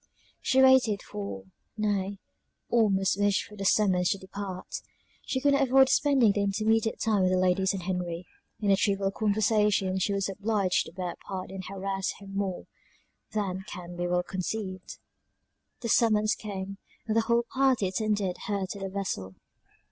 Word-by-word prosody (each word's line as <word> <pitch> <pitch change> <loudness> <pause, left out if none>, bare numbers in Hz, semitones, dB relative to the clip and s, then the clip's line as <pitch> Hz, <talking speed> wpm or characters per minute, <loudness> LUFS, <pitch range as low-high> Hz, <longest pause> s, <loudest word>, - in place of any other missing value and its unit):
She 265 0 +4
waited 250 -6 +5
for, 100 -1 -6 0.3
nay, 200 -2 -1 0.5
almost 195 -4 +3
wished 205 -1 +2
for 210 - -13
the 195 -1 -5
summons 185 -3 +3
to - - +1
depart. 190 -1 -6 0.5
She 260 - 0
could 285 +1 +3
not 280 - +3
avoid 265 +1 +6
spending 270 -7 +4
the 205 - 0
intermediate 220 +2 +1
time 215 -3 +2
with 185 - +3
the 185 - +3
ladies 185 +1 +2
and 195 -3 -4
Henry; 180 -1 -3 0.3
and 205 -2 +1
the 195 - +5
trivial 195 -1 +1
conversations 210 -2 +1
she 200 - +1
was 195 -1 0
obliged 200 -1 0
to - - -10
bear 180 0 -4
a - - -10
part 190 -1 -6
in 190 0 -6
harassed 195 0 -3
her 200 - -12
more 195 -1 -3 0.7
than 195 -3 -2
can 175 -2 -8
be 175 0 -2
well 180 0 +1
conceived. 185 +1 -5 0.8
The 235 - -3
summons 215 -2 +3
came, 195 -2 -6 0.3
and 220 -1 -1
the 225 - +5
whole 235 +1 +2
party 260 -6 +3
attended 205 -1 -1
her 200 -2 -1
to 200 - -6
the 195 0 -4
vessel. 185 - -4
195 Hz, 170 wpm, -28 LUFS, 185-215 Hz, 0.8 s, avoid